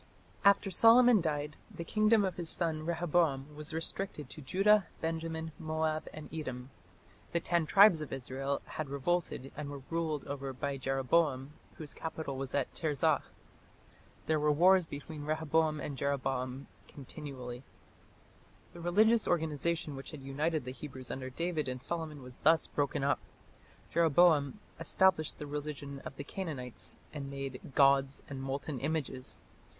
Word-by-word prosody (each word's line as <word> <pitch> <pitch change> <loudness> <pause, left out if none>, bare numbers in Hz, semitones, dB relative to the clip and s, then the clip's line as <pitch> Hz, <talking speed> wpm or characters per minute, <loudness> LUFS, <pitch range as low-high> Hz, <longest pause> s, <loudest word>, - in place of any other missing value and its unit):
After 200 -1 +5
Solomon 230 +2 +7
died, 150 -2 -2
the 170 - -7
kingdom 215 +3 +3
of 185 -2 -3
his 170 -2 -3
son 160 -2 -1
Rehoboam 160 -4 +1
was 150 +1 -5
restricted 165 0 -4
to 155 - -9
Judah, 195 +8 +4
Benjamin, 160 0 -3
Moab, 155 -1 -1
and 155 -1 -8
Edom. 130 -4 -5 0.6
The 170 - +3
"ten 170 -1 +1
tribes" 195 -4 +7
of 150 - -6
Israel 135 +2 -3
had 155 -3 -5
revolted 140 -1 -1
and 145 0 -5
were 140 -2 -7
ruled 160 -3 -1
over 140 -1 -4
by 140 +2 -3
Jeroboam, 135 +1 +1 0.2
whose 155 -2 -8
capital 160 -3 -5
was 135 0 -4
at 140 -2 0
Tirzah. 150 -4 +1 1.0
"There 155 -1 +2
were 150 0 +3
wars 180 +3 +5
between 145 +1 -7
Rehoboam 155 0 +1
and 145 -1 -4
Jeroboam 135 -1 -1 0.2
continually." 135 -3 -8 1.1
The 175 - -10
religious 215 +6 +4
organization 160 -2 0
which 135 - -8
had 150 -4 -9
united 145 +2 -1
the 130 - -4
Hebrews 130 -2 -8
under 130 -1 -4
David 160 +2 -2
and 130 0 -4
Solomon 160 -5 -4
was 125 0 -12
thus 160 +2 +4
broken 140 -1 -1
up. 140 - +2 0.7
Jeroboam 165 0 +4 0.2
established 190 -5 +2
the 150 - -6
religion 145 -1 -5
of 135 - -8
the 140 - -6
Canaanites 140 -8 -5 0.2
and 140 -2 -5
made 135 -2 -5
"gods 135 -1 +4
and 135 -2 -6
molten 135 +1 -3
images". 140 -3 -3
150 Hz, 145 wpm, -32 LUFS, 135-165 Hz, 1.1 s, Solomon